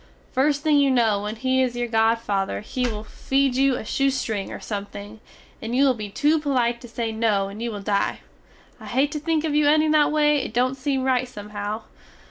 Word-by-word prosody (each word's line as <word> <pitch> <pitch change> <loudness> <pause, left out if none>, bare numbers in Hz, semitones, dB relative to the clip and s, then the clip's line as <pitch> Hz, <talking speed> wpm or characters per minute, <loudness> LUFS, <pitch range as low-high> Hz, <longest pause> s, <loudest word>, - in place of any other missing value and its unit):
Fust 285 +2 +1
thing 300 -2 +4
you 280 -1 +4
no 225 -6 +2
when 210 +1 -4
he 260 +3 +1
is 250 -2 0
your 240 0 -2
godfather 225 -4 0
he 250 +3 -2
will 215 -2 -4
feed 270 +4 0
you 270 0 +3
a - - -5
shoestring 255 -6 -1
or - - -6
something, 205 +1 -7 0.4
and 225 +2 -3
you 275 +2 +4
will 265 - +4
be 215 -3 -6
two 300 +9 +2
polite 245 -5 0
to 245 - -10
say 230 -1 -3
no 215 -3 +1
and 205 +3 -9
you 235 - -2
will 205 -2 -7
dye. 200 0 0 0.6
I - - -11
hate 270 +4 +1
to 300 - -3
think 315 0 0
of 315 -2 -1
you 300 0 +3
ending 310 +1 +4
that 305 -1 +4
way 300 -1 +3
it 265 -5 -3
dont 255 +2 +2
seem 270 0 -1
rite 255 -1 +1
somehow. 210 -1 -6
245 Hz, 215 wpm, -23 LUFS, 215-275 Hz, 0.6 s, thing